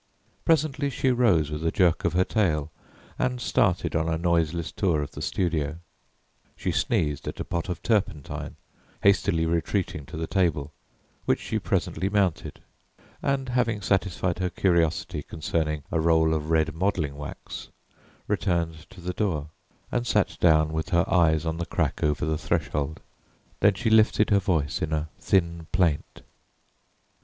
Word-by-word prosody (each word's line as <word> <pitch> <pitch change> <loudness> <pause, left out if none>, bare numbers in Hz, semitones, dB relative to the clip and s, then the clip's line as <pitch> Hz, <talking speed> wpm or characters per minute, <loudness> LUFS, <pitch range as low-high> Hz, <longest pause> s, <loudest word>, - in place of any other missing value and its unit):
Presently 150 -3 +2
she 130 -1 +1
rose 100 - +3
with 75 +1 -4
a 80 - +2
jerk 90 -2 +2
of 85 - +1
her 90 +1 +4
tail 80 -8 0 0.5
and 125 -1 0
started 105 -10 +1
on 80 0 +1
a 80 - 0
noiseless 85 -1 0
tour 85 -7 +1
of 70 - -7
the 75 - -8
studio. 80 -3 -1 0.8
She - - -2
sneezed 75 -2 0
at - - -5
a - - -1
pot 85 +2 -3
of 90 - -4
turpentine, 100 - -1 0.5
hastily 90 -4 +3
retreating 85 -3 -1
to - - -7
the 80 - -2
table, 80 -6 0 0.5
which - - +2
she - - -2
presently 95 - -1
mounted, 100 -5 0 0.6
and 135 -2 -1
having 120 -3 +1
satisfied 95 -2 0
her 90 -1 0
curiosity 85 -3 +1
concerning 75 0 -2
a 80 - +1
roll 80 0 +3
of 80 -1 -2
red 80 -1 +2
modelling 80 -5 -1
wax, 75 0 -8 0.6
returned 85 -3 -1
to 95 - -13
the 90 +1 -3
door 80 -8 -1 0.4
and 120 -1 -1
sat 105 -3 +1
down 80 -2 +4
with 80 +4 -2
her 85 -3 +3
eyes 80 -4 +3
on 80 0 -1
the 85 - -2
crack - - -1
over 75 -3 +1
the 80 -1 -1
threshold 75 +2 -2 0.6
Then 100 0 +4
she 110 +3 0
lifted 110 0 +4
her 100 - +5
voice 80 -6 0
in 80 0 -1
a 75 0 -1
thin 85 -3 0
plaint. 85 -5 0
85 Hz, 155 wpm, -26 LUFS, 80-95 Hz, 0.8 s, her